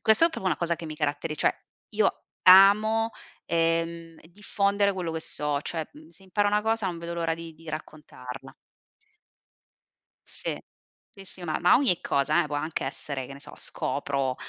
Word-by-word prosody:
questa 220 +9 +5
è - - -2
proprio 190 - -5
una 175 -5 +2
cosa 170 0 0
che 165 - -8
mi 155 - -6
caratteri 150 +1 -2
cioè, - - +2 0.4
io - - +1 0.3
amo, 215 +4 +7 0.3
ehm, 165 0 -1
diffondere 200 +1 +1
quello 175 -3 -3
che 160 - -3
so 150 -2 -1
cioè, 160 +1 -4
mhmm, 155 +1 -15
se 170 +3 -20
imparo 205 +2 0
una 210 +1 +1
cosa 225 -2 0
non 175 -2 -3
vedo 170 0 -6
l'ora 165 -1 -1
di 165 0 -9
di 165 +1 -15
raccontarla. 150 -4 -8 1.8
Sì, - - -5 0.5
sì, 195 -1 -14
sì, 185 -1 -9
ma 155 -2 -1
ma 175 - +6
ogni 245 -10 +2
cosa, 150 +4 +2
eh, - - -4
può 145 - -2
anche 155 +2 -3
essere, 135 -3 -4
che 140 - -10
ne 135 - -10
so, - - -5
scopro, 135 -2 -1
165 Hz, 180 wpm, -26 LUFS, 155-195 Hz, 1.8 s, amo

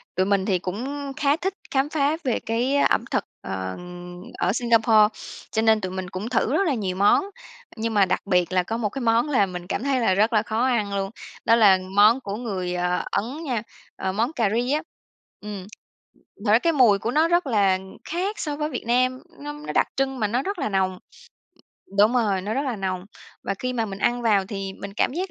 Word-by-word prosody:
Tụi 185 +1 +2
mình 200 -1 +2
thì 185 -3 +1
cũng 270 +10 -4
khá 285 0 +3
thích 380 +2 -2 0.2
khám 275 +2 +1
phá 300 +1 +1
về 250 -4 0
cái 240 +5 0
ẩm - - +2
thực, - - +1 0.2
ờ, 95 -1 -4 0.6
ở 180 - +2
Singapore, 225 -3 +4 0.4
cho 220 - +1
nên 220 -1 +4
tụi 185 -1 -3
mình 185 -1 -4
cũng 200 +5 -5
thử 250 0 +1
rất 385 +3 +2
là 300 - +2
nhiều 195 -6 -2
món, 205 - +4 0.5
nhưng 225 0 -2
mà 200 -2 +5
đặc 185 - 0
biệt 180 -2 +2
là 180 - +3
có 225 +5 -3
một 215 -3 -1
cái 270 +5 -6
món 230 +4 +2
làm 200 -10 +2
mình 180 0 -6
cảm 225 - -2
thấy 275 -2 +1
là 225 -6 +3
rất 215 +5 +2
là 215 -1 +3
khó 220 +3 0
ăn 215 -6 0
luôn, 195 0 -1 0.4
đó 230 - +6
là 200 -5 +6 0.2
món 215 +5 +6
của 200 -4 -4
người 190 -6 -3 0.4
Ấn 255 +11 -2
nha, 245 -7 -2 0.3
ờ, 190 - -2
món 230 +9 -1
cà 230 -8 +1
ri 245 +2 0
á. 305 - +1 0.6
Ừm, 205 -3 -7 0.8
thật 205 - +3
ra 225 - +6
cái 330 +3 +1
mùi 235 -8 +5
của 230 - -2
nó 310 +4 +3
rất 345 -2 +2
là 200 -6 +3 0.3
khác 380 +6 -2
so 295 -2 -2
với 300 0 -2
Việt 255 - -5
Nam, 255 +2 +2 0.2
nó 295 +1 -6
nó 295 +1 -7
đặc - - +3
trưng 270 -1 0
mà 210 - +1
nó 245 +5 0
rất 395 0 -3
là 275 - -1
nồng 190 -2 0 1.0
đúng 210 +3 +6
rồi, 210 -6 +2
nó 210 +3 -3
rất 275 - 0
là 260 -5 -2
nồng, 185 -2 -3 0.4
và - - -1
khi 255 0 -2
mà 230 -3 0
mình 195 -1 -6
ăn 240 +2 +1
vào 210 -4 +3
thì 195 -1 -5
mình 200 0 -7
cảm - - +2
giác 370 +3 -3
225 Hz, 225 wpm, -24 LUFS, 195-265 Hz, 1.0 s, đó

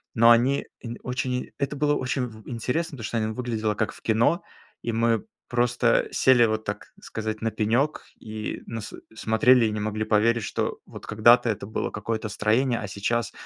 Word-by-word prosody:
но 115 +1 +7
они 125 +4 +3 0.2
нь 120 0 -6
очень 125 0 -2
это 140 +1 -1
было 145 +1 +2
очень 130 -1 -1
в 110 -3 -11
интересно, 135 +6 -2
потому 115 - -8
что 115 - -2
они 110 -1 0
выглядело 110 -4 -2
как 110 +1 -1
в - - -15
кино. 115 - +2 0.4
И 115 - -2
мы 115 - +1 0.2
просто 120 0 +2
сели, 125 -2 +5
вот 110 0 -1
так 105 0 -5
сказать, 110 -1 -5
на 115 0 0
пенек, 120 +9 0
и 110 0 -5
нас 115 -2 -6 0.2
смотрели 115 +3 +4
и 110 - 0
не 105 - -3
могли 110 +1 -2
поверить, 110 +1 +2
что - - -2
вот - - -10
когда-то 120 +3 +5
это 100 - -2
было 110 - -3
какое-то 110 +1 -3
строение, 120 +4 +1
а 105 - -5
сейчас 105 +4 -1
115 Hz, 185 wpm, -25 LUFS, 110-125 Hz, 0.4 s, но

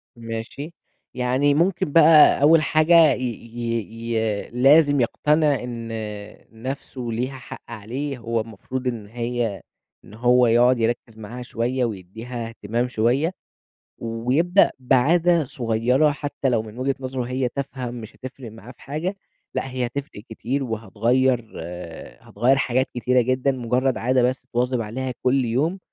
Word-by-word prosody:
ماشي. 115 +7 -6 0.4
يعني 130 +3 +2
ممكن 170 -1 +1
بقى 155 -2 +7
أول 155 +2 +6
حاجة 155 0 +5
ي 130 - -5
ي 115 -1 -4
ي 110 -2 -1
لازم 140 +3 +5
يقتنع 150 +2 +2
إن 115 -2 -6 0.8
نفْسه 135 0 -5
ليها 125 +4 -3
حق 125 - -10
عليه، 125 +6 -5
هو 115 -1 -2
المفروض 115 +4 -6
إن 115 -4 -3
هي 120 -2 -3 0.4
إن - - -15
هو 125 +2 +4
يقعُد 120 +2 +4
يركّز 115 -1 -2
معاها 115 +3 -8
شوية 125 +1 -1
ويدّيها 115 +4 -6
إهتمام 115 +2 -2
شوية 125 +7 +1 0.7
ويبدأ 125 - +2
بعادة 160 +6 +3
صغيّرة 125 +4 +1
حتى 145 -2 -3
لو 115 -3 +1
من 110 +1 -11
وجهة 135 +1 0
نظَره 130 -1 -3
هي 125 +1 -1
تافهة 130 -2 -5
مش 115 -2 -9
هتفرِق 130 -2 -9
معاه 115 +3 -12
في - - -22
حاجة، 160 +8 -3 0.4
لأ 135 - -2
هي 125 -1 -1
هتفرِق 125 -4 -6
كتير 130 +5 -3
وهتغيّر 115 +2 0
آآ، 85 0 -9
هتغيّر 125 +6 +2
حاجات 130 0 +1
كتيرة 125 +1 +2
جدًا، 130 +3 +1
مجرّد 125 -1 0
عادة 125 +1 +2
بس 130 +1 0
تواظِب 125 0 0
عليها 125 +4 -4
كلّ 130 0 +2
يوم. 145 +11 0
125 Hz, 140 wpm, -23 LUFS, 115-135 Hz, 0.8 s, بقى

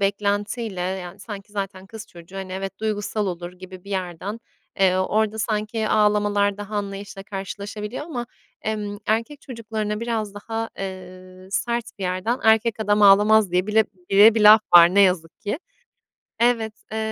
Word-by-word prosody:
beklentiyle, 205 +1 -1
yani, 185 0 -4
sanki 205 -1 -9
zaten 195 -2 -5
kız 220 +2 -10
çocuğu, 175 +1 -13
hani, 190 -1 -6
evet, 195 +1 -5
duygusal 210 -1 -2
olur 175 -1 -5
gibi 185 0 -12
bir 200 - -11
yerden, 190 +3 -4 0.4
eee, 185 -1 +4
orada 215 +3 0
sanki 215 0 -1
ağlamalar 205 -1 +2
daha 205 +1 -6
anlayışla 200 0 -5
karşılaşabiliyor 205 +4 -6
ama, 245 -7 -5 0.4
emm, 210 -2 -3
erkek 230 +7 -1
çocuklarına 220 -4 -4
biraz 225 -3 -3
daha, 225 +2 -5
eee, 185 -1 -9
sert 235 +3 -1
bir - - -7
yerden, 185 +7 -1
"Erkek 220 0 +3
adam 210 0 +2
ağlamaz." 205 0 +6
diye 180 +2 +1
bile 220 +1 +3 0.3
bile 210 +3 +7
bir 225 - +1
laf 210 +1 +9
var, 175 +1 +9
ne 200 - +6
yazık 180 -4 +1
ki. 205 +7 -3 0.8
Evet. 230 -2 +2 0.2
Eee, 220 - -3
205 Hz, 155 wpm, -23 LUFS, 190-220 Hz, 0.8 s, laf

